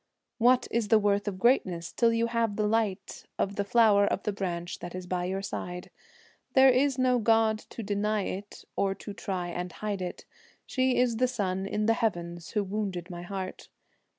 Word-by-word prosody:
What 245 +2 +4
is 230 -2 0
the 220 - +6
worth 205 -1 +1
of 195 -2 -2
greatness 185 -8 +2
till 235 -1 +3
you 230 0 +1
have 230 -3 0
the 210 - 0
light 210 -3 -1
Of 200 0 -1
the 200 - 0
flower 205 -1 +4
of 195 - -1
the 210 - -1
branch 175 -3 -4
that 175 0 -7
is 185 -1 -6
by 180 0 -2
your 190 +2 -2
side? 180 -2 -5 0.6
There 265 0 +7
is 265 +1 +2
no 255 -1 +3
god 225 -1 +3
to 230 - -7
deny 210 +1 0
it 200 +3 -6
or 195 -1 +1
to 205 +1 -8
try 185 -3 -3
and 175 +1 -4
hide 205 -1 -4
it, 180 - -5 0.4
She 260 -1 +1
is 245 -2 +2
the 255 +2 +3
sun 195 -6 -2
in 210 +1 -1
the 225 - +4
heavens 175 -7 -2
who 210 -2 +1
wounded 190 -3 -3
my 175 0 -6
heart. 185 +1 -6
205 Hz, 195 wpm, -28 LUFS, 185-230 Hz, 0.6 s, There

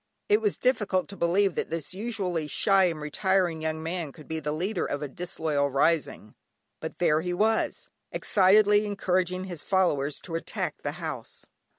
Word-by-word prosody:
It 420 +2 +4
was 420 -2 0
difficult 210 -7 +1
to 200 - -7
believe 190 +2 +2
that - - -2
this 165 0 -4
usually 190 -7 -2
shy 195 +4 +3
and 165 -3 -1
retiring 175 +2 0
young 160 0 -2
man 165 -2 -3
could 155 +2 -14
be 160 0 -3
the 150 -1 -3
leader 180 +8 -1
of 145 +1 -3
a - - -2
disloyal 155 -2 -1
rising, 140 -5 0 0.5
but - - -6
there 160 -3 +3
he 175 +1 -2
was, 220 +4 +1 0.2
excitedly 205 +2 +4
encouraging 185 -2 0
his 175 -5 -5
followers 150 -7 +1
to 165 - -9
attack 165 - -3
the - - -3
house. - - -6
180 Hz, 170 wpm, -27 LUFS, 155-195 Hz, 0.5 s, It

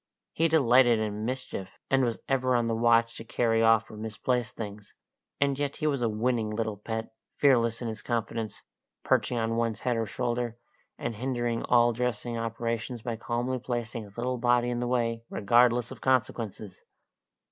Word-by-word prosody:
He 165 - +2
delighted 130 -6 +5
in 105 0 -2
mischief, 125 -6 -5
and 135 -1 +4
was 120 -2 0
ever 130 -1 +2
on 120 -1 +2
the 115 - 0
watch 115 0 +3
to - - -7
carry 115 0 +1
off 115 -1 +4
or - - -9
misplace 115 +3 -2
things; 105 -3 -8 0.4
and 140 -1 +1
yet 145 -1 -1
he - - -4
was 140 -4 +1
a 115 - +2
winning 110 0 0
little 110 -1 -2
pet, 110 +2 -5 0.2
fearless 120 -4 +3
in - - -2
his 110 -1 -5
confidence, 115 -3 -3 0.4
perching 125 - +2
on 115 0 0
one's 115 -2 -1
head 125 -2 0
or 115 -1 -1
shoulder, 120 0 -2 0.4
and 115 - -4
hindering 120 -1 -1
all 120 -1 +4
dressing 120 0 -2
operations 115 +1 -3
by 120 -2 -2
calmly 120 +3 -2
placing 120 -2 -3
his 105 0 -13
little 125 +1 -1
body 120 0 +3
in 120 - -2
the 120 - -1
way, 115 -2 0
regardless 120 +3 +3
of - - -9
consequences. 115 -6 -1
115 Hz, 175 wpm, -28 LUFS, 115-125 Hz, 0.4 s, delighted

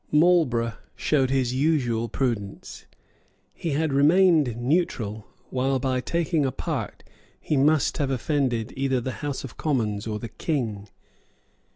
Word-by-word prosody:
Marlborough 150 -8 +3 0.2
showed 135 -4 +1
his 130 -2 +1
usual 130 -5 +1
prudence. 110 -6 -3 0.7
He 165 -4 -3
had 155 0 0
remained 150 - +4
neutral 120 - -1 0.2
while 130 +1 +1
by 130 0 -1
taking 170 +1 0
a 135 - 0
part - - -4 0.4
he 150 - -1
must 145 +1 +2
have 140 -2 0
offended 130 -3 -1
either 135 -1 0
the 130 +2 -3
House 145 -2 -3
of 130 - -9
Commons 110 -8 -1
or 105 -1 -2
the 115 +2 -7
King. 110 -10 -3
135 Hz, 135 wpm, -25 LUFS, 115-150 Hz, 0.7 s, remained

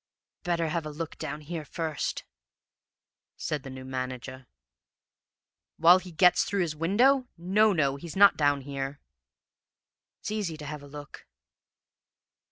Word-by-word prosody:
"'Better 170 -3 0
have 165 +1 -1
a 155 - -5
look 155 +1 -6
down 150 - -5
here, 160 +1 -5
first,' 155 +1 -3 1.1
said 150 -2 -3
the 135 - -9
new 130 0 -8
manager. 130 0 -5 1.3
"'While 175 +3 +7
he 185 -1 -11
gets 180 +1 +5
through 200 -1 -1
his 160 -3 -1
window? 245 - +3
No, 200 +5 +3
no, 140 -6 +1
he's 165 +2 -9
not 200 0 +7
down 145 -2 +2
here.' 140 +1 -5 1.2
"'It's - - -5
easy 200 -7 -2
to 150 - -9
have 150 0 -6
a 145 - -12
look.' 145 +1 -11
155 Hz, 140 wpm, -28 LUFS, 140-180 Hz, 1.3 s, While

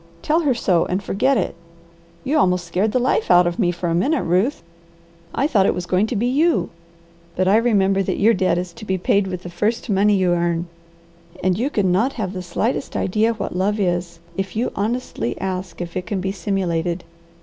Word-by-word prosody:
Tell 315 +2 +2
her 290 -7 +1
so 180 -7 +2
and 185 +3 -2
forget 255 +8 +1
it. 195 - -1 0.7
You 275 +3 -1
almost 180 -5 +2
scared 185 +5 0
the 255 - +1
life 250 -2 +1
out 180 0 +6
of 175 +5 -2
me 180 -5 +3
for 175 0 -4
a 165 - 0
minute, 265 - +1
Ruth. 185 - +1 0.7
I 275 - 0
thought 205 -10 +3
it - - +1
was 180 - -4
going 185 +4 +1
to 240 - -3
be 220 +3 0
you. 260 - +2 0.6
But 185 0 +1
I 200 +3 +5
remember 200 -4 +2
your 205 +3 +2
debt 185 -3 +1
is 175 -1 -4
to 215 - -12
be 190 -2 0
paid 190 +2 +1
with 180 -1 -5
the 175 - -6
first 210 +6 -1
money 205 +1 +3
you 185 -2 +2
earn, 170 -1 0 0.8
and 185 0 +2
you 245 +8 0
can 200 -9 +1
not 225 +10 +2
have 205 -5 -4
the 185 - -4
slightest 210 +10 -2
idea 220 +4 +1
what 200 -4 -5
love 205 +3 0
is, 175 -3 -1 0.2
if 195 +3 -4
you 230 +3 0
honestly 210 - -2
ask 185 -2 -4
if 170 -1 -6
it 185 -1 -3
can 200 - -2
be 190 +1 -2
simulated. 175 -2 -2
190 Hz, 210 wpm, -21 LUFS, 180-220 Hz, 0.8 s, out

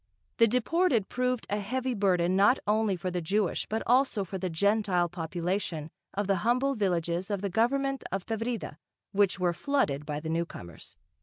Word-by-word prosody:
The 230 - +6
deported 250 - +1
proved 250 -1 -1
a 205 - -1
heavy 255 +5 -2
burden 185 -4 +2
not 205 +7 +5
only 210 -1 +2
for 180 +1 -4
the 180 0 -2
Jewish 195 +3 0
but 220 +1 -2
also 250 -4 +3
for 190 +1 -6
the 185 - -2
Gentile 195 0 +2
population 170 -1 -3 0.2
of 205 +1 0
the 195 0 +2
humble 250 +8 +1
villages 180 -4 -1
of 200 -2 -1
the 200 -2 -2
government 270 +6 +1
of 195 0 -2
Tavrida, 225 -7 -3 0.3
which 200 -1 +2
were 175 -1 +2
flooded 170 - 0
by 150 -1 -2
the 160 - -7
newcomers. 160 - -5
200 Hz, 170 wpm, -29 LUFS, 175-230 Hz, 0.3 s, The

